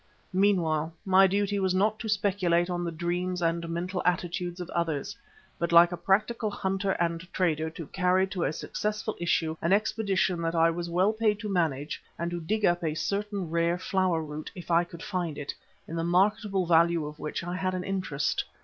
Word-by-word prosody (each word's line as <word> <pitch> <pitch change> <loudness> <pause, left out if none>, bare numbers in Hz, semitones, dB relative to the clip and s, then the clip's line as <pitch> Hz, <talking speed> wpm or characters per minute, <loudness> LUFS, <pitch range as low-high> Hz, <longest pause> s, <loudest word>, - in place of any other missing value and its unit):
Meanwhile 165 -5 +2
my 190 0 +6
duty 200 +1 0
was 190 -1 +1
not 215 +3 +2
to 220 - -4
speculate 185 -4 +1
on 175 0 -2
the 170 - -2
dreams 175 +2 -2
and 170 0 -1
mental 180 +2 -2
attitudes 180 0 -1
of 180 - -5
others, 165 -5 -2 0.4
but 170 0 -1
like 170 +1 +7
a - - -2
practical 215 +5 +1
hunter 195 -1 -1
and 170 0 -2
trader, 160 -3 0
to 165 0 -8
carry 185 +3 +2
to 185 -3 -2
a - - +1
successful 210 +6 -3
issue 165 -2 +1
an 170 +3 +2
expedition 195 -4 +1
that 165 0 -1
I 165 0 +4
was 170 +1 -4
well 185 +5 +2
paid 215 -1 +1
to 210 - -4
manage, 155 -6 -1 0.2
and 170 +1 -2
to 175 0 -3
dig 210 +5 0
up 175 0 +2
a 155 -2 -1
certain 200 -1 -2
rare 170 +1 +1
flower 185 -3 0
root, 150 0 -6
if 180 -1 -7
I 170 +1 +4
could 170 -1 -11
find 175 -6 -3
it, 145 -1 -4 0.3
in 165 - -6
the 165 - -1
marketable 195 +2 +2
value 170 -1 +3
of 150 +1 -8
which 150 - -4
I 175 +1 -4
had 185 0 -1
an 180 - -3
interest. 150 -8 -1
175 Hz, 195 wpm, -28 LUFS, 165-195 Hz, 0.4 s, like